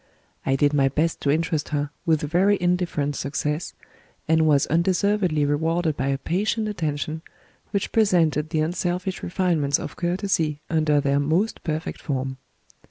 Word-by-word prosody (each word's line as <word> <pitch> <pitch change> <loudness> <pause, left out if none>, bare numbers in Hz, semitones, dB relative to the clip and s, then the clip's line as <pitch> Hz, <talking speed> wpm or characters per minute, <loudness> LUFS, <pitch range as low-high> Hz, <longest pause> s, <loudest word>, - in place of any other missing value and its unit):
I 135 - +3
did 145 +2 +2
my 135 -2 +3
best 155 +4 -1
to 140 - 0
interest 155 0 0
her, 145 -1 -2 0.2
with 160 -2 +3
very 185 +7 +3
indifferent 175 -5 0
success, 150 +4 -2 0.5
and 160 0 +3
was 145 -2 +4
undeservedly 180 -1 +1
rewarded 160 +2 0
by 130 - -2
a 135 0 +1
patient 205 +9 -1
attention, 155 -5 -3 0.5
which 200 -1 -2
presented 165 -8 +2
the 155 - 0
unselfish 180 +3 -2
refinements 170 -6 +1
of - - -7
courtesy 175 -4 -1
under 155 -2 +3
their 140 0 +1
most 165 +10 0
perfect 160 0 -3
form. 130 -3 -3
160 Hz, 145 wpm, -24 LUFS, 145-180 Hz, 0.5 s, was